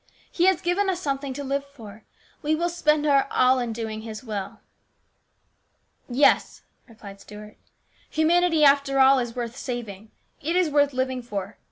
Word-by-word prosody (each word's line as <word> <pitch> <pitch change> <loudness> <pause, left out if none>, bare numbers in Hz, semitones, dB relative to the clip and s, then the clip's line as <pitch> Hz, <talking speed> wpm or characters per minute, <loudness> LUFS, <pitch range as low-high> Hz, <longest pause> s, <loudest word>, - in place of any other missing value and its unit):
" - - -30
He 350 - +1
has 375 -2 +3
given 380 +2 0
us 365 -2 -1
something 275 -4 -3
to 285 - -5
live 275 +1 -2
for. 225 -7 -14 0.4
We 310 0 0
will 340 +2 -1
spend 300 -3 +1
our 280 -2 +3
all 255 +1 +3
in 240 -2 -3
doing 220 -1 -5
His 220 0 -8
will." 210 -5 -6 0.8
" - - -43
Yes," 255 +4 +2 0.2
replied 205 -4 -13
Stuart, 210 +1 -12 0.2
" - - -36
humanity, 325 0 +2
after 280 -1 +4
all, 265 0 +6
is 240 -2 -4
worth 240 -1 -5
saving; 225 -6 -6 0.3
it 330 +4 -2
is 360 -4 +2
worth 285 -1 +2
living 260 0 -2
for. 205 -3 -6
270 Hz, 175 wpm, -24 LUFS, 225-300 Hz, 0.8 s, all